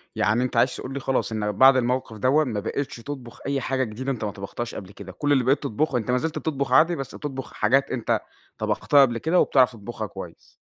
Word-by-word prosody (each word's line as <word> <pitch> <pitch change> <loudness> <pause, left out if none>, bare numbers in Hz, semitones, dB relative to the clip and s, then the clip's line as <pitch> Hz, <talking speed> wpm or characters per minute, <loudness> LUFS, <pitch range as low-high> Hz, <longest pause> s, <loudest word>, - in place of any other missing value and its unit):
يعني 110 +6 +2
أنت 125 -2 -2
عايز 125 +2 +3
تقول 130 - -6
لي 140 - -3
خلاص، 135 -3 -1
إن 105 -1 -1
بَعد 130 +6 +6
الموقف 125 -2 -1
دوًّا 135 +8 +3
ما 115 -7 -2
بقيتش 135 +7 -3
تطبُخ 120 -1 -8
أي 140 -1 0
حاجة 130 +1 0
جديدة 130 +4 -4
أنت 120 -4 -4
ما 105 - -2
طبختهاش 100 +5 -6
قبْل 95 -1 -8
كده، 100 -2 -10
كلّ 145 +9 -2
اللي 135 -3 +4
بقيت 135 +3 +2
تطبخُه 140 +4 0
أنت 120 0 -2
ما 125 - +3
زلت 160 +4 -2
بتطبُخ 140 -4 -2
عادي 165 +6 +5
بس 135 -4 -6
بتطبُخ 135 -3 -6
حاجات 130 +6 +2
أنت 120 -4 0 0.4
طبَختها 145 - +3
قبْل 120 -4 +3
كده 165 +7 +2
وبتعرَف 130 -2 +4
تطبُخها 110 -1 -6
كويس. - - -11
130 Hz, 225 wpm, -24 LUFS, 115-140 Hz, 0.4 s, بَعد